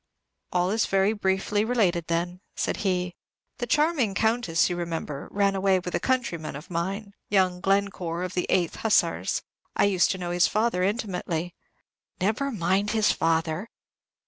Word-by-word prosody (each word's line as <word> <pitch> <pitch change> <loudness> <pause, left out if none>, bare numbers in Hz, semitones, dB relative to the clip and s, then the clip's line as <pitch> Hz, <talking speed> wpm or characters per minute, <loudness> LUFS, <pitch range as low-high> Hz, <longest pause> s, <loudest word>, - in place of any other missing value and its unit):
"All 180 +1 +1
is 220 +1 +1
very 195 +2 +3
briefly 205 0 0
related, 195 -8 +1
then," 175 +2 -2
said - - -1
he. 180 -3 -1 0.5
"The 240 - -2
charming 295 - +2
Countess, 220 -6 +2
you 180 - -2
remember, 165 -4 -4
ran 200 -1 +2
away 195 0 +3
with 180 -1 -5
a - - +1
countryman 235 - -1
of 150 +5 -9
mine, 195 +5 -3 0.2
young 185 -3 +2
Glencore, 195 -3 0
of 185 0 -4
the 180 - -1
8th 175 -3 +1
Hussars; 220 -2 +1 0.3
I - - +3
used 190 -3 +3
to 190 - -1
know 175 -1 -4
his 175 0 +4
father 215 -3 +1
intimately." 180 -4 -2 0.7
"Never 220 +9 0
mind 195 0 +1
his 215 - +4
father." 165 +5 0
190 Hz, 155 wpm, -26 LUFS, 175-210 Hz, 0.7 s, his